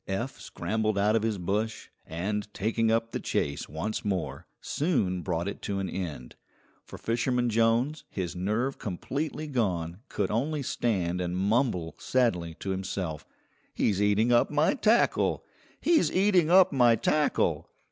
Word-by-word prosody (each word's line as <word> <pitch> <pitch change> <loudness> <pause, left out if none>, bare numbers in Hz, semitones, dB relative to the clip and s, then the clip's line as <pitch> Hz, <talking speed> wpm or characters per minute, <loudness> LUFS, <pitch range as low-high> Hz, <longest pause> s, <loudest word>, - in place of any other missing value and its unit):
Eph 105 +4 -3
scrambled 110 +4 -2
out 105 +2 +3
of 115 - +2
his 110 -2 -1
bush, 105 +5 -2 0.2
and, 105 +6 -3
taking 110 +2 +1
up 115 0 +1
the - - -3
chase 70 - -2
once 80 +9 -3
more, 95 -5 -3
soon 115 - 0
brought 85 0 -2
it 100 - -5
to 100 - -3
an 95 -1 -2
end, 80 -10 -5 0.5
for - - -10
Fisherman 120 +1 0
Jones, 115 +7 +2
his 90 -2 -4
nerve 110 +9 -1
completely 145 - -3
gone, 90 - -1
could 100 - -1
only 140 +6 -1
stand 90 -8 -1
and 90 0 -2
mumble 100 -4 +1
sadly 90 -11 0
to 95 - -4
himself, 95 -4 -4 0.5
"He's 100 -2 +1
eating 105 +3 +3
up 120 - +4
my 150 +1 +2
tackle! 230 -2 +2 0.3
He's 335 -2 +3
eating 185 -4 +3
up 185 +1 +6
my 120 -3 +5
tackle!" 150 +5 +1
105 Hz, 145 wpm, -28 LUFS, 95-125 Hz, 0.5 s, up